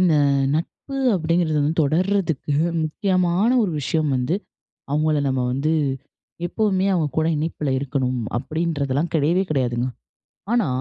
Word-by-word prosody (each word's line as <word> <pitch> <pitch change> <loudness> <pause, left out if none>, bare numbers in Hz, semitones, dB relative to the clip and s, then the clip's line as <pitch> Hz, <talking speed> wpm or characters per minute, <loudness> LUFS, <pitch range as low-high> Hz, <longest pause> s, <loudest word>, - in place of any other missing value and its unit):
இந்த 175 -4 +4 0.4
நட்பு 225 - -4 0.2
அப்படீங்குறது 165 -2 +1
வந்து 155 +3 +1
தொடருதற்கு 165 -2 0 0.3
முக்கியமான 185 +4 +1
ஒரு 195 - 0
விஷயம் 155 +1 0
வந்து, 125 +7 0 0.6
அவங்கள 150 0 +2
நம்ப 130 -1 0
வந்து, 145 +5 0 0.7
எப்போதுமே 195 -1 +1
அவங்க 160 -4 +1
கூட 160 - +2
இணைப்புல 150 -2 -2
இருக்கணும், 130 -2 -1 0.2
அப்படீன்றதுலாம் 155 0 -1
கிடையவே 165 +5 +3
கிடையாதுங்க. 125 -3 0 0.7
ஆனா, 235 -9 +2
155 Hz, 115 wpm, -22 LUFS, 140-175 Hz, 0.7 s, இந்த